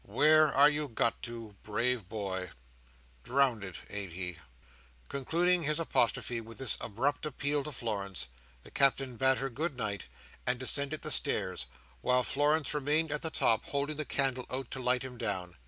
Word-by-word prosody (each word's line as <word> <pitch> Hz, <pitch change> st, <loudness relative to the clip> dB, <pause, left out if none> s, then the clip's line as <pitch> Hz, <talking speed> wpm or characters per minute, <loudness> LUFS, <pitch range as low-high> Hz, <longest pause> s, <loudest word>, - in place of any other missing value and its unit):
Where 155 Hz, 0 st, +5 dB
are 140 Hz, +2 st, +7 dB
you 150 Hz, 0 st, 0 dB
got 115 Hz, -1 st, 0 dB
to, 115 Hz, -3 st, -7 dB
brave 115 Hz, -1 st, -1 dB
boy? 95 Hz, -4 st, -4 dB, 0.7 s
Drownded, 120 Hz, -9 st, 0 dB
ain't 100 Hz, -4 st, -5 dB
he?" 90 Hz, -1 st, -5 dB, 0.7 s
Concluding 170 Hz, +6 st, +2 dB
his 150 Hz, 0 st, +1 dB
apostrophe 120 Hz, -6 st, +1 dB
with 115 Hz, 0 st, -12 dB
this 135 Hz, -2 st, +3 dB
abrupt 135 Hz, +7 st, -1 dB
appeal 145 Hz, -1 st, -1 dB
to 150 Hz, -, -6 dB
Florence, 100 Hz, -, -3 dB, 0.4 s
the -, -, -13 dB
Captain 135 Hz, -2 st, +2 dB
bade 130 Hz, +2 st, +4 dB
her 135 Hz, -1 st, -3 dB
good 145 Hz, +2 st, -3 dB
night, 105 Hz, -4 st, -3 dB, 0.4 s
and 125 Hz, 0 st, +1 dB
descended 140 Hz, +3 st, +1 dB
the -, -, -1 dB
stairs, -, -, 0 dB, 0.3 s
while 125 Hz, -, +3 dB
Florence 145 Hz, +3 st, +2 dB
remained 150 Hz, +2 st, +1 dB
at 150 Hz, -, -1 dB
the 160 Hz, -, 0 dB
top, 115 Hz, -7 st, +2 dB
holding 145 Hz, +1 st, -1 dB
the 155 Hz, -, 0 dB
candle 135 Hz, -3 st, 0 dB
out 130 Hz, -1 st, -4 dB
to 130 Hz, -, -4 dB
light 125 Hz, 0 st, +2 dB
him 125 Hz, -2 st, -8 dB
down. 90 Hz, -6 st, -2 dB
130 Hz, 165 wpm, -31 LUFS, 115-145 Hz, 0.7 s, are